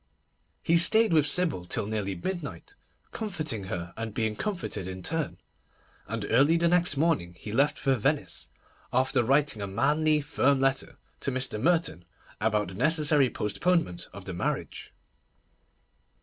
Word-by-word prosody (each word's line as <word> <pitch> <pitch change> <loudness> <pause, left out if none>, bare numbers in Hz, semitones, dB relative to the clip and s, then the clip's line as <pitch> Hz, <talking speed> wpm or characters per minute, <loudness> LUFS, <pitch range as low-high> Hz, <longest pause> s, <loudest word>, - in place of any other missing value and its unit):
He 170 - +3
stayed 220 +4 +5
with 155 -2 +4
Sybil 160 - +2
till 90 - -1
nearly 100 -2 -3
midnight, 175 - -6 0.4
comforting 155 - -3
her 85 -2 -5
and 110 -1 -6
being 110 -2 -1
comforted 170 - -4
in 95 -1 -7
turn, 160 -1 -2 0.7
and 115 0 -4
early 145 +6 +4
the 170 0 +2
next 175 -3 +2
morning 100 - 0
he 105 - -8
left 145 +4 +2
for 135 - +1
Venice, 140 +5 -1 0.4
after 130 0 +2
writing 135 -2 +1
a 100 - -3
manly, 150 +9 +2
firm 140 -1 +1
letter 135 0 0 0.2
to 140 - -2
Mr. 130 -4 -2
Merton 165 - +1 0.4
about 105 -2 0
the - - -9
necessary 150 - +3
postponement 120 - -1
of 100 0 -11
the 95 - -5
marriage. 85 - -4
135 Hz, 145 wpm, -27 LUFS, 105-160 Hz, 0.7 s, stayed